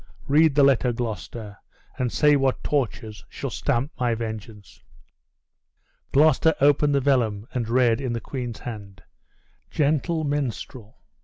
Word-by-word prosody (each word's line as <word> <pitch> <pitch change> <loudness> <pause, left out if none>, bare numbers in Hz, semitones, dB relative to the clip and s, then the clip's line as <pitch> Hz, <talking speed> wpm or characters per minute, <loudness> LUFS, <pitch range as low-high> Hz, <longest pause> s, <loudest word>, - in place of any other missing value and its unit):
Read 150 +1 +4
the 145 - +5
letter, 135 -2 +3
Gloucester, 110 -2 -6 0.4
and 125 -2 0
say 150 -1 +4
what 135 -2 0
tortures 110 -6 -2
shall 135 - -6
stamp 135 +3 -1
my 120 -2 +1
vengeance!" 110 -2 -8 1.3
Gloucester 155 +2 +4
opened 145 +1 +3
the - - +3
vellum, 120 -7 +1
and 120 -3 -2
read, 120 0 +2
in 130 -3 -2
the 115 - -2
queen's 120 -1 -6
hand: 100 -5 -9 0.7
"Gentle 155 +2 0
minstrel! 130 -5 -4
125 Hz, 130 wpm, -24 LUFS, 115-145 Hz, 1.3 s, the